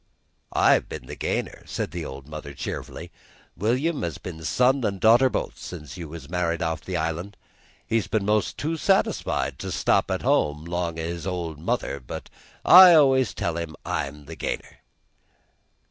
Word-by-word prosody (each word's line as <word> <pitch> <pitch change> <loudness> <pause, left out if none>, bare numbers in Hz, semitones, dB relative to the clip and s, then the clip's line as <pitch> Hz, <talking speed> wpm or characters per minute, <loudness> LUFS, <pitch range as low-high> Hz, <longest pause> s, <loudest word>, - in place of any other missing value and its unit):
"I've - - +4
been - - -7
the - - -8
gainer," - - -3
said - - -3
the 85 -2 -5
old 65 +1 -8
mother 75 -2 -8
cheerfully. - - -6 0.4
"William 130 - 0
has 85 -4 -3
been 80 -3 -8
son 125 - +2
an' 100 -3 0
daughter 115 +6 +5
both - - -3
since 75 -6 -8
you 85 -4 -7
was 80 -3 -9
married 85 0 -1
off 80 +1 -2
the 90 -2 -3
island. 85 +5 -3 0.5
He's 115 -3 0
been 105 -3 0
'most 105 -1 +1
too 160 +3 -2
satisfied 75 - +1
to - - -5
stop - - +2
at - - -2
home 75 +1 +1
'long 85 -1 -2
o' 80 - -3
his 85 +1 -4
old 85 -5 -4
mother, 70 -2 -2
but 60 - -8 0.3
I 180 -1 +10
always 130 - +4
tell 85 -1 -2
'em 80 -2 -5
I'm 70 +1 -3
the 80 +3 -8
gainer." - - -5
85 Hz, 170 wpm, -25 LUFS, 80-110 Hz, 0.5 s, I